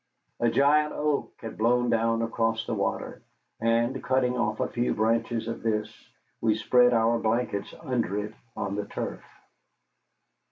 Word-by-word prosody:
A 120 Hz, -, +3 dB
giant 150 Hz, +5 st, +3 dB
oak 150 Hz, -1 st, -1 dB
had 115 Hz, -, -7 dB
blown 120 Hz, +2 st, +3 dB
down 115 Hz, 0 st, +2 dB
across 115 Hz, -1 st, 0 dB
the -, -, -3 dB
water, -, -, -2 dB, 0.4 s
and, 115 Hz, +3 st, +1 dB
cutting 125 Hz, -1 st, +1 dB
out 110 Hz, -3 st, -1 dB
a -, -, +1 dB
few 120 Hz, 0 st, -1 dB
branches 115 Hz, +1 st, 0 dB
of 115 Hz, -, -4 dB
this, 105 Hz, -2 st, -1 dB, 0.5 s
we 110 Hz, -2 st, +3 dB
spread 125 Hz, +2 st, +4 dB
our 115 Hz, 0 st, +3 dB
blankets 110 Hz, -3 st, -1 dB
under 120 Hz, -, -1 dB
it 105 Hz, +1 st, -3 dB, 0.2 s
on 100 Hz, -1 st, -2 dB
the 105 Hz, 0 st, -2 dB
turf. -, -, -5 dB
115 Hz, 150 wpm, -27 LUFS, 110-125 Hz, 0.5 s, spread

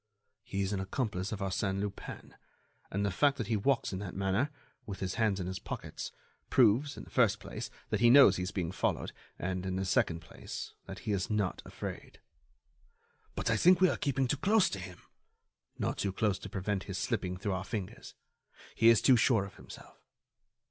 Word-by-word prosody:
"He 100 Hz, 0 st, -3 dB
is 95 Hz, +2 st, -1 dB
an 100 Hz, -, -1 dB
accomplice 95 Hz, -1 st, -2 dB
of 105 Hz, -2 st, -4 dB
Arsène 95 Hz, 0 st, -1 dB
Lupin, 100 Hz, 0 st, -6 dB, 0.6 s
and 100 Hz, +1 st, -1 dB
the 100 Hz, -, +1 dB
fact 140 Hz, -1 st, +3 dB
that 115 Hz, -, -2 dB
he 110 Hz, +2 st, 0 dB
walks 120 Hz, +1 st, +1 dB
in 95 Hz, -, -3 dB
that 95 Hz, -3 st, -6 dB
manner, 100 Hz, +8 st, +1 dB, 0.4 s
with 100 Hz, -3 st, -5 dB
his 95 Hz, -2 st, -2 dB
hands 105 Hz, -3 st, +2 dB
in 90 Hz, -, -3 dB
his 95 Hz, +1 st, -4 dB
pockets, -, -, -6 dB, 0.4 s
proves, 130 Hz, +4 st, +4 dB
in -, -, -7 dB
the -, -, -15 dB
first -, -, +3 dB
place, -, -, -6 dB, 0.2 s
that -, -, +1 dB
he 120 Hz, -, +6 dB
knows 125 Hz, -7 st, +8 dB
he -, -, -2 dB
is 90 Hz, -, -2 dB
being 90 Hz, -3 st, -2 dB
followed 95 Hz, -, -1 dB, 0.3 s
and, 90 Hz, 0 st, -2 dB
in 95 Hz, -1 st, -2 dB
the 95 Hz, +1 st, -1 dB
second 85 Hz, -2 st, +1 dB
place, 80 Hz, -, -8 dB
that 95 Hz, 0 st, -7 dB
he 110 Hz, -, 0 dB
is 95 Hz, -2 st, -1 dB
not 105 Hz, -4 st, 0 dB
afraid." -, -, -7 dB, 1.2 s
"But -, -, 0 dB
I 110 Hz, -, +3 dB
think 180 Hz, +7 st, +6 dB
we 185 Hz, -1 st, +6 dB
are -, -, 0 dB
keeping 135 Hz, -2 st, 0 dB
too 145 Hz, -, 0 dB
close 210 Hz, +5 st, +3 dB
to 100 Hz, -, -4 dB
him." 90 Hz, -2 st, -9 dB, 0.7 s
"Not -, -, -2 dB
too 100 Hz, -, 0 dB
close 105 Hz, +1 st, 0 dB
to -, -, -8 dB
prevent 95 Hz, 0 st, -2 dB
his 95 Hz, -2 st, -4 dB
slipping 95 Hz, -6 st, -1 dB
through 100 Hz, 0 st, -2 dB
our 95 Hz, 0 st, -2 dB
fingers. 100 Hz, -2 st, -6 dB, 0.6 s
He 115 Hz, -, +5 dB
is 115 Hz, -, +5 dB
too 130 Hz, -, +7 dB
sure 115 Hz, -3 st, +3 dB
of 100 Hz, -, -12 dB
himself." -, -, -13 dB
100 Hz, 205 wpm, -32 LUFS, 95-115 Hz, 1.2 s, knows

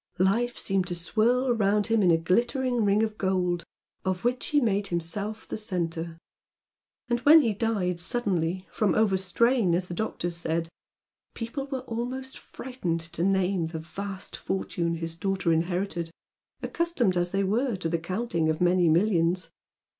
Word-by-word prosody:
Life 230 Hz, +7 st, +2 dB
seemed 190 Hz, -2 st, 0 dB
to 175 Hz, -, -3 dB
swirl 240 Hz, +8 st, +2 dB
round 205 Hz, -2 st, +2 dB
him 225 Hz, -1 st, +2 dB
in 185 Hz, -, +4 dB
a 165 Hz, -, +5 dB
glittering 235 Hz, -, +1 dB
ring 205 Hz, +1 st, +3 dB
of 215 Hz, -1 st, -3 dB
gold 180 Hz, -2 st, 0 dB, 0.4 s
of 185 Hz, -1 st, -1 dB
which 245 Hz, +1 st, 0 dB
he 295 Hz, -, +3 dB
made 205 Hz, -5 st, +1 dB
himself 190 Hz, +6 st, -3 dB
the -, -, -4 dB
centre, 170 Hz, -5 st, -3 dB, 0.9 s
and 240 Hz, 0 st, +1 dB
when 300 Hz, +5 st, +7 dB
he 225 Hz, -4 st, +1 dB
died 200 Hz, -5 st, -1 dB
suddenly 185 Hz, -3 st, -1 dB
"from 205 Hz, -5 st, +1 dB
overstrain" 200 Hz, 0 st, +2 dB
as 180 Hz, +1 st, -1 dB
the -, -, -4 dB
doctors 175 Hz, -3 st, -3 dB
said, 165 Hz, 0 st, -2 dB, 0.7 s
people 245 Hz, +4 st, -4 dB
were 265 Hz, -2 st, -3 dB
almost 255 Hz, +3 st, -5 dB
frightened 185 Hz, -11 st, -4 dB
to 170 Hz, -, -1 dB
name 190 Hz, -2 st, +2 dB
the 160 Hz, 0 st, -5 dB
vast 190 Hz, +4 st, -6 dB
fortune 170 Hz, -3 st, -2 dB
his 165 Hz, 0 st, -4 dB
daughter 190 Hz, -1 st, 0 dB
inherited, 175 Hz, +1 st, -1 dB, 0.5 s
accustomed 335 Hz, -, 0 dB
as 175 Hz, 0 st, +1 dB
they 195 Hz, +2 st, 0 dB
were 230 Hz, +5 st, +1 dB
to 185 Hz, -3 st, -2 dB
the 165 Hz, 0 st, 0 dB
counting 170 Hz, -2 st, -1 dB
of 155 Hz, -, 0 dB
many 180 Hz, -1 st, +4 dB
millions. 175 Hz, 0 st, +2 dB
190 Hz, 155 wpm, -27 LUFS, 175-230 Hz, 0.9 s, when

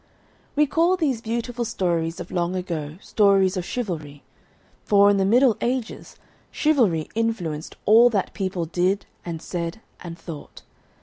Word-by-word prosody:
We 300 Hz, +1 st, +4 dB
call 335 Hz, +5 st, +2 dB
these 275 Hz, -9 st, 0 dB
beautiful 235 Hz, +1 st, -3 dB
stories 170 Hz, -6 st, -1 dB
of -, -, -8 dB
long 175 Hz, 0 st, -1 dB
ago 165 Hz, -4 st, -4 dB
Stories 195 Hz, -2 st, +3 dB
of 185 Hz, -, -2 dB
Chivalry, 160 Hz, -, -5 dB, 0.6 s
for, 200 Hz, 0 st, +5 dB
in 200 Hz, -, +2 dB
the 195 Hz, -, +2 dB
Middle 240 Hz, +3 st, +4 dB
Ages, 245 Hz, -2 st, -3 dB, 0.3 s
chivalry 230 Hz, -, +2 dB
influenced 195 Hz, -9 st, -2 dB
all 230 Hz, +4 st, +7 dB
that 200 Hz, -5 st, -1 dB
people 185 Hz, -4 st, -2 dB
did 180 Hz, +4 st, 0 dB, 0.2 s
and 165 Hz, -2 st, -6 dB
said 170 Hz, +2 st, -4 dB, 0.2 s
and 170 Hz, -1 st, -8 dB
thought. 160 Hz, -5 st, -10 dB
195 Hz, 140 wpm, -23 LUFS, 170-230 Hz, 0.6 s, all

